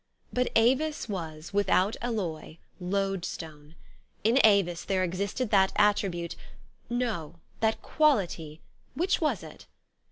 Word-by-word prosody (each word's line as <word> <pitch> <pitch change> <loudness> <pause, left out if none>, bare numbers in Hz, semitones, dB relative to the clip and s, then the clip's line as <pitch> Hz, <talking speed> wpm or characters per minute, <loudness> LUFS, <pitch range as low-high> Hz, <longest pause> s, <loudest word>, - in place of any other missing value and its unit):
But 250 0 +1
Avis 265 +7 +2
was, 165 -4 -6
without 200 +1 +2
alloy, 185 -10 -3 0.2
loadstone. 180 -5 -3 0.5
In 230 +5 +4
Avis 195 -5 +4
there 190 -1 0
existed 200 +6 -2
that 190 -2 +4
attribute 195 -5 +1 0.5
no, 220 -10 -2 0.2
that 220 0 0
quality; 180 - +1 0.3
which 355 +6 +1
was 310 - 0
it - - -12
195 Hz, 105 wpm, -28 LUFS, 170-230 Hz, 0.5 s, In